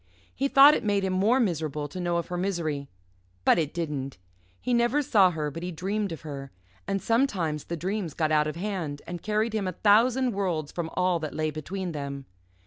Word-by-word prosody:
He 275 - 0
thought 275 +2 +8
it - - -1
made 205 -2 +1
him 190 -1 0
more 210 +8 +3
miserable 155 - -1
to 185 - -8
know 175 -1 0
of 170 - -3
her 180 - -3
misery. 170 -7 -2 0.6
But - - +5
it 155 -2 -1
didn't. 145 - -4 0.4
He 250 - -1
never 240 +5 +2
saw 200 -8 +5
her, 155 -3 -3
but 165 - -7
he 180 +1 -4
dreamed 195 +4 -2
of 165 - -6
her, 140 -3 -7 0.4
and 195 - 0
sometimes 190 - 0
the 170 - -4
dreams 185 -1 -3
got 155 -2 0
out 150 0 +3
of 155 - -4
hand, 170 -6 -4
and 175 -1 -6
carried 215 +1 0
him 210 -3 -1
a 185 - -2
thousand 240 +5 +4
worlds 175 -7 -2
from 170 -2 -4
all 180 -1 +2
that 155 -2 -5
lay 155 0 0
between 175 +5 -4
them. 140 -2 -5
175 Hz, 210 wpm, -27 LUFS, 155-205 Hz, 0.6 s, thought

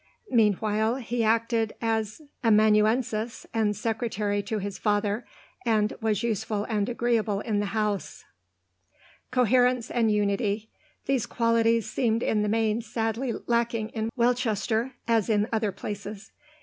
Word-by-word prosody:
Meanwhile 220 0 +2
he 240 -2 -2
acted 225 0 +1
as 225 +3 -2 0.2
amanuensis 220 +1 +2
and 215 -2 +1
secretary 210 -2 -1
to 215 +2 -3
his 200 -1 -5
father, 210 +1 0 0.4
and 215 -2 +2
was 220 -2 0
useful 220 -2 -1
and 210 -1 -1
agreeable 235 -4 0
in 215 -2 -1
the 205 - -1
home. 210 -1 0 1.3
Coherence 250 0 +2
and 230 -2 +2
unity; 210 +1 0 0.3
these 265 -5 0
qualities 230 -1 +2
seemed 230 -2 0
in 210 - +1
the 210 - 0
main 220 +1 +1
sadly 225 +2 -2
lacking 235 -2 0
in 220 -1 -3
Welchester, 235 0 +1
as 230 -3 +2
in 210 -1 +2
other 215 -2 +1
places. 200 +1 -7
220 Hz, 125 wpm, -27 LUFS, 210-230 Hz, 1.3 s, Meanwhile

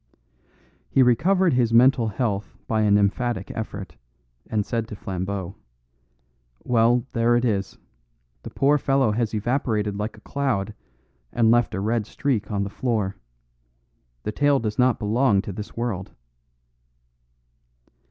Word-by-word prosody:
He 135 - +4
recovered 175 +9 +3
his 120 -2 +2
mental 125 -1 +5
health 105 -2 -3
by 110 -1 0
an 105 -1 +4
emphatic 100 0 0
effort, 100 -7 -6 0.5
and 105 -2 0
said 115 -2 -2
to 105 - -7
Flambeau, 95 0 -4 1.1
"Well, 120 0 +3
there 120 0 +3
it 120 +1 +1
is. 100 -4 -1 0.6
The - - -8
poor 145 +2 +2
fellow 135 -4 +2
has 115 0 -1
evaporated 110 -2 -1
like 105 +2 -4
a - - -16
cloud 120 -8 -2 0.6
and 115 -2 +3
left 120 -2 +2
a - - -2
red 110 +1 -1
streak 125 -6 -1
on 100 -2 -1
the 100 - -4
floor. 110 -6 -1 1.1
The - - -2
tale 145 +4 +3
does 110 0 -3
not 125 -1 +4
belong 110 0 +2
to 100 - -6
this 105 +4 -8
world." 110 -6 -3
115 Hz, 135 wpm, -24 LUFS, 105-125 Hz, 1.1 s, mental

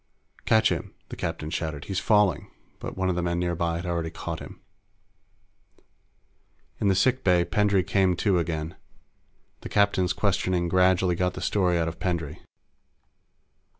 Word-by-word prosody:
"Catch 110 -1 +4
him!" - - -4
the - - -6
captain 75 +1 -4
shouted. 80 -3 -3
"He's 95 -1 -2
falling!" 105 -7 +2 0.3
But - - -7
one 95 0 0
of 95 - +1
the 90 - -1
men 85 0 -1
nearby 85 -1 -1
had 85 +2 -4
already 85 -2 -2
caught - - -6
him. - - -10 2.2
In 105 - +1
the 95 - +3
sick 130 +7 +2
bay, 90 -2 +3
Pendray 100 -2 +2
came 95 -1 +2
to 95 0 +2
again. 80 -1 -3 0.8
The - - -8
captain's 95 -3 +2
questioning 95 -3 0
gradually 90 0 +3
got 90 +1 -1
the - - -6
story 90 -4 +1
out 85 -1 0
of 85 - -6
Pendray. 80 -5 -2
90 Hz, 150 wpm, -26 LUFS, 85-95 Hz, 2.2 s, Catch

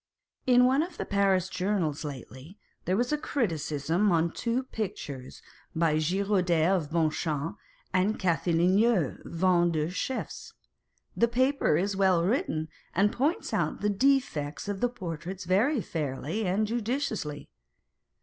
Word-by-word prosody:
In 250 0 +6
one 265 +3 +3
of 340 0 -5
the - - -3
Paris 195 -2 +2
journals 180 -5 -1
lately, 140 - -9 0.3
there 185 +2 +1
was 245 +3 0
a 300 - 0
criticism 170 - 0
on 165 0 +2
two 235 +7 -1
pictures 150 - -6 0.3
by 160 -2 +2
Girodet 180 0 +2
of 160 -6 -2
Bonchamps 160 -1 -1 0.4
and 190 +4 +1
Cathelineau, 180 - +2
Vendean 170 -2 +1
chiefs. 260 +6 -4 0.6
The 235 - +3
paper 255 - +2
is 195 +3 0
well 190 -3 +3
written, 175 - 0 0.3
and 200 +3 +3
points 290 +9 -1
out - - -1
the 210 - +1
defects 200 - +1
of 200 -1 -3
the 245 - +2
portraits 180 -4 -6
very 220 - +2
fairly 160 +6 -3
and 200 +4 +1
judiciously. 225 - -3
185 Hz, 130 wpm, -28 LUFS, 160-225 Hz, 0.6 s, In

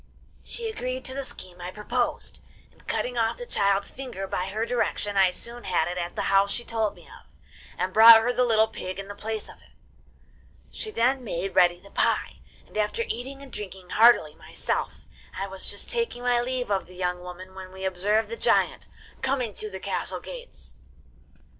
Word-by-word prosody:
'She 465 -1 -3
agreed 255 - -4
to 260 - -2
the 275 +1 -3
scheme 180 -8 -6
I 175 - -4
proposed, 240 +5 -2 0.3
and, - - -25
cutting 245 -1 -1
off 225 -1 +1
the 485 - -6
child's 200 - +1
finger, 250 -8 -6
by 185 -1 -2
her 215 +4 -1
direction 210 -4 -1
I 190 -1 +6
soon 235 +6 -5
had 175 -3 +2
it 180 +1 -3
at 175 0 -4
the - - -1
house 195 0 +4
she 240 - 0
told 220 -2 -1
me - - -16
of, - - -15 0.5
and 185 0 -1
brought 225 +1 +11
her 240 +2 +1
the 250 - +3
little 220 -2 +4
pig 185 -4 -6
in 195 0 -6
the 205 - -6
place 215 +1 -4
of - - -13
it. - - -21 1.0
She 435 - -4
then 260 - +1
made 195 -3 -3
ready 175 -1 +5
the 200 +2 -16
pie, - - +1 0.3
and - - -20
after 215 - +1
eating 270 +4 -5
and 270 - -12
drinking 190 -3 -7
heartily 225 -9 +6
myself, - - -3 0.3
I 195 - -1
was 190 -1 -5
just 205 - -5
taking 465 - -2
my 245 -1 +3
leave 250 -2 -2
of 195 -3 0
the 180 - -14
young 180 -1 -1
woman 180 +1 -9
when 190 -1 -9
we 190 0 -6
observed 200 +4 +1
the 465 - -4
giant - - +2 0.3
coming 260 -5 0
through 215 - -6
the 190 -1 -7
castle - - -3
gates. - - -10
210 Hz, 195 wpm, -26 LUFS, 190-245 Hz, 1.0 s, brought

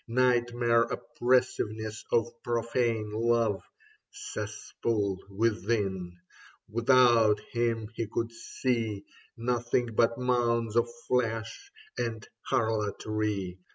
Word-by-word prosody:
Nightmare 120 -1 +3
oppressiveness 115 -4 0
of 115 -1 +3
profane 115 -2 0
love. 115 -2 +2 0.5
Cesspool 100 -4 -3
within, 110 +1 +1
and 95 -2 -5 0.5
without 115 -2 +5
him 115 -2 0
he 115 -1 -3
could 115 0 -1
see 115 -3 -2 0.3
Nothing 120 0 0
but 115 +1 +3
mounds 120 -3 +1
of 120 0 +3 0.2
flesh 115 - -1 0.3
and 115 -3 -3 0.2
harlotry. 105 -3 -1
115 Hz, 85 wpm, -29 LUFS, 110-120 Hz, 0.5 s, without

